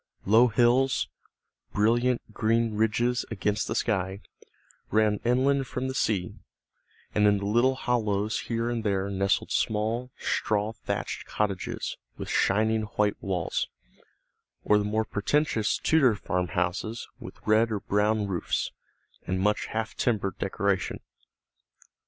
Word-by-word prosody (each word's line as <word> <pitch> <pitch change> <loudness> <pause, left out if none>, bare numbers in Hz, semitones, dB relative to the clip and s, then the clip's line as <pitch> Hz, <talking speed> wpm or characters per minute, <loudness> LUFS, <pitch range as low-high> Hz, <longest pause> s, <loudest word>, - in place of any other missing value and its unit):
Low 110 +5 +6
hills, 125 +3 +3 0.6
brilliant 120 +2 +1
green 115 +1 +1
ridges 110 +3 +1
against 105 0 -1
the 110 - -2
sky, 95 -3 -1 0.7
ran 105 -1 +2
inland 130 +3 +2
from 130 0 -3
the 130 - -3
sea, 100 -8 -1 0.7
and 105 0 +4
in 105 0 +4
the 100 - -4
little 120 +6 +3
hollows 110 -4 0
here 115 0 -2
and 120 -2 -2
there 100 -1 0
nestled 100 0 0
small 110 +4 0
straw 105 0 0
thatched - - -4
cottages 100 -3 -2 0.2
with - - -6
shining 110 +2 +2 0.2
white 105 -1 +1
walls, 90 -4 -1 1.0
or 105 - +4
the - - 0
more 110 +2 0
pretentious 110 +1 +1
Tudor 135 -8 +3
farmhouses 90 +3 -2
with - - -10
red 110 +1 +3
or 105 -2 -2
brown 105 +1 +1
roofs, 95 -4 -2 0.6
and 95 0 0
much 105 +2 +1
half 110 0 -3
timbered 105 -5 -1
decoration. 100 0 -1
110 Hz, 125 wpm, -27 LUFS, 100-115 Hz, 1.0 s, Low